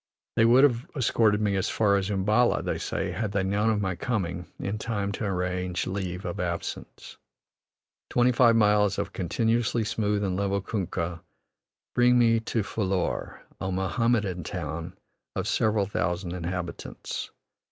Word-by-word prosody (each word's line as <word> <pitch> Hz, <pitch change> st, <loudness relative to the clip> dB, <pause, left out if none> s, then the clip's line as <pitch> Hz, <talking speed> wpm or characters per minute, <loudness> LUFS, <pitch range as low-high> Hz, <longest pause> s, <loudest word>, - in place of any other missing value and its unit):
They 115 Hz, -, +5 dB
would 125 Hz, +4 st, +6 dB
have 125 Hz, -3 st, +2 dB
escorted 110 Hz, -5 st, +2 dB
me 100 Hz, -2 st, +1 dB
as 95 Hz, -, 0 dB
far 100 Hz, -2 st, +3 dB
as 100 Hz, 0 st, 0 dB
Umballa, 105 Hz, +5 st, +2 dB
they -, -, -2 dB
say, -, -, -2 dB
had 110 Hz, -3 st, -3 dB
they 95 Hz, -, +1 dB
known 100 Hz, +3 st, +1 dB
of 105 Hz, -2 st, +1 dB
my 95 Hz, -2 st, -1 dB
coming 90 Hz, -5 st, -2 dB
in 105 Hz, +2 st, -3 dB
time 100 Hz, -3 st, -2 dB
to 105 Hz, -, -3 dB
arrange 90 Hz, -1 st, -1 dB
leave' 95 Hz, -1 st, -4 dB
of 90 Hz, -, -4 dB
absence. 85 Hz, -2 st, -5 dB, 0.9 s
Twenty 125 Hz, +1 st, +3 dB
five 120 Hz, -1 st, +5 dB
miles 105 Hz, -2 st, +4 dB
of 100 Hz, 0 st, -3 dB
continuously 115 Hz, +5 st, +1 dB
smooth 105 Hz, -2 st, 0 dB
and 95 Hz, -2 st, 0 dB
level 100 Hz, +1 st, 0 dB
kunkah, 85 Hz, -4 st, -3 dB, 0.7 s
bring 125 Hz, 0 st, +5 dB
me 115 Hz, -1 st, +4 dB
to 115 Hz, -1 st, -1 dB
Phillour, 95 Hz, -3 st, -2 dB, 0.2 s
a 95 Hz, -, -2 dB
Mohammedan 95 Hz, -1 st, 0 dB
town 85 Hz, +5 st, -5 dB, 0.4 s
of -, -, -2 dB
several 110 Hz, -2 st, +2 dB
thousand 90 Hz, -1 st, -2 dB
inhabitants. 90 Hz, 0 st, -5 dB
100 Hz, 150 wpm, -27 LUFS, 90-115 Hz, 0.9 s, would